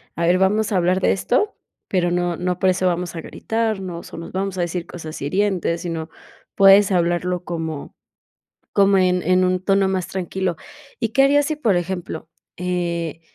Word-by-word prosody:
a 170 - 0
ver, 180 +2 +3
vamos 210 +3 +2
a 200 - +2
hablar 180 +1 +2
de - - +2
esto, 255 - 0 0.3
pero 180 -2 +1
no 175 -1 0
no 180 0 -1
por 185 0 +3
eso 185 0 0
vamos 175 0 -2
a 165 - -4
gritarnos, 195 -5 -3
o - - -8
nos 165 - -8
vamos 190 0 -3
a 180 - 0
decir 175 0 -3
cosas 160 -3 -8
hirientes 180 +2 0
sino 165 -2 -4 0.5
puedes 195 +1 +7
hablarlo 175 0 0
como 160 -4 -5 0.8
como 200 0 +4
en 180 -1 +3
en 185 +2 +3
un 185 0 +1
tono 195 0 +3
más 190 -2 -1
tranquilo, 185 -2 -3 0.4
y 225 -3 -1
qué 270 +4 +4
harías 290 +1 +4
si 310 -1 -2
por 225 -10 +2
ejemplo, 175 -3 -4 0.3
eh, 170 -3 -2
180 Hz, 180 wpm, -21 LUFS, 175-195 Hz, 0.8 s, puedes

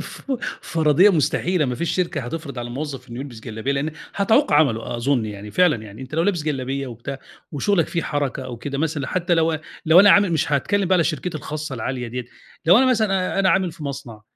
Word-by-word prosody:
ف 275 - -7 0.3
فَرَضيّة 160 +5 +4
مستحيلة، 170 +1 +1
ما 125 - -1
فيش 170 +7 -2
شركة 170 -5 -1
هتفرض 140 +1 -6
على 120 0 -4
الموظف 135 -1 -6
إنه 120 +2 -6
يلبس 125 -5 -8
جلابية 110 +3 -3
لإن 140 +3 -1 0.2
هتعوق 220 +8 +3
عمله 120 -6 +2
أظُن 125 -1 +1
يعني، 105 -1 -7
فعلًا 180 0 +3
يعني 105 +4 -10
أنت 130 +3 -8
لو 165 - +2
لابس 175 -4 0
جلابية 135 -2 -2
وبتاع 125 +3 -7 0.3
وشغلك 170 +4 +1
فيه 170 - -2
حركة 145 -3 -2
أو 125 -2 -6
كده 140 +3 -5
مثلًا 150 -3 -1
حتى 175 -1 0
لو 165 -1 +2 0.3
لو 165 +3 +8
أنا 205 0 +7
عامل 200 -4 +5
مش 155 -1 0
هاتكلّم 195 +7 +1
بقى 190 - +4
على 170 - +3
شركتي 160 +1 -2
الخاصة 155 -2 -5
العالية 125 +1 -4
ديّة، 125 +1 -5 0.4
لو 180 +6 +7
أنا 260 - +4
مثلًا 200 -7 +1
أنا 190 -1 +4
عامل 190 -3 +1
في 155 - -12
مصنع 135 -6 -7
150 Hz, 210 wpm, -22 LUFS, 130-175 Hz, 0.4 s, لو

